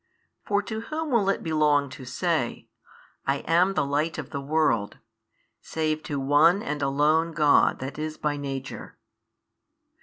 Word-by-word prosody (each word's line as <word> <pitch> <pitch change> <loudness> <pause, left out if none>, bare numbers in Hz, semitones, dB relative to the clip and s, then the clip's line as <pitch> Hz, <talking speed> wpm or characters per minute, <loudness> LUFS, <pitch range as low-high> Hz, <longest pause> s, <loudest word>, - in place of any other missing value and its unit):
For 205 0 0
to 220 +2 -5
whom 310 +5 -4
will 215 -5 +3
it - - -1
belong 150 -3 +2
to 130 - -9
say, 125 - -2 0.6
I 140 +1 +1
am 180 +4 +3
the 140 - +1
light 150 +4 -1
of 155 -5 -7
the 140 - -4
world, 140 -8 0 0.6
save 155 -1 -2
to 145 -2 -3
One 150 +8 +4
and 145 0 -3
Alone 150 +4 +2
God 150 -3 +4
That 135 +3 -6
is 155 0 -4
by 150 -1 -1
Nature? 135 -2 -6
150 Hz, 150 wpm, -26 LUFS, 140-165 Hz, 0.6 s, One